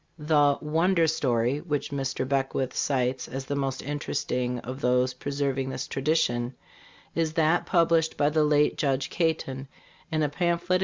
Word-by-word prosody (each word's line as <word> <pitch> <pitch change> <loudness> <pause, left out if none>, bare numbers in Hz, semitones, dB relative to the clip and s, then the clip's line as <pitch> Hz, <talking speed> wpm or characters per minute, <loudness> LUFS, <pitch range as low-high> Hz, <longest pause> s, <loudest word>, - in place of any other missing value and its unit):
The 150 -2 +3
"wonder 165 +3 +2
story" 130 -4 +1
which 150 -5 -3
Mr. 135 -2 -2
Beckwith 135 -1 -1
cites 130 -2 0
as 135 +1 -5
the 140 - -2
most 135 -1 -2
interesting 125 -3 -2
of 130 +3 -7
those 125 0 +2
preserving 135 0 -2
this 130 - -4
tradition 135 -4 0 0.6
is 160 -2 0
that 160 +1 +2
published 165 -2 +2
by 145 +1 +2
the 155 0 +3
late 150 0 +2
Judge 135 -2 0
Caton, 145 -5 -1 0.4
in 155 -1 +1
a - - +3
pamphlet. 175 +3 +1
140 Hz, 150 wpm, -27 LUFS, 130-160 Hz, 0.6 s, The